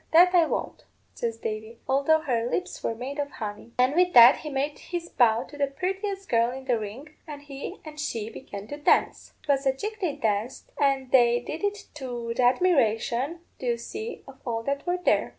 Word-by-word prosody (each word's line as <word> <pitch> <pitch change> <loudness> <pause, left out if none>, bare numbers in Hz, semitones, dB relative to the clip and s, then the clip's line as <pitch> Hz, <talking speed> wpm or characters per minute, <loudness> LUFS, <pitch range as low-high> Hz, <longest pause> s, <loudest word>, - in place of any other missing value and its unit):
'That 355 +2 +7
I 340 -3 +5
won't,' - - -4 0.3
says 230 -1 -3
Davy, 220 +1 -5
'although 280 +4 +3
her 240 -4 -1
lips 365 +6 -3
were 230 - -2
made 265 +5 -6
of 285 0 -1
honey.' 215 0 -7
And 255 +2 +3
with 360 +2 +3
that 240 +2 +9
he 305 - -7
made 285 +1 -2
his 345 -1 -5
bow 230 -1 +3
to 290 +2 -13
the 280 - +2
purtiest 385 +6 -3
girl 230 0 +3
in 260 +1 -7
the 245 -3 +1
ring, 240 +9 -8
and 290 -2 -8
he 280 -1 -7
and 305 -1 -9
she 225 -8 -3
began 205 -6 -8
to 290 - -5
dance. 295 - +1
'Twas 275 -1 +1
a 265 - +4
jig 425 +10 -5
they 335 -6 0
danced, 215 +3 -2
and 270 -2 +1
they 240 -2 +5
did 310 +8 -6
it 405 0 -2
to 245 -5 -5
th' - - -12
admiration, 255 +1 +2 0.2
do 255 - -4
you 235 -1 +1
see, 430 - -7
of 270 -1 -13
all 230 -2 -2
that 280 +5 -3
were 355 +1 +1
there. 360 - +2
270 Hz, 205 wpm, -26 LUFS, 235-315 Hz, 0.3 s, that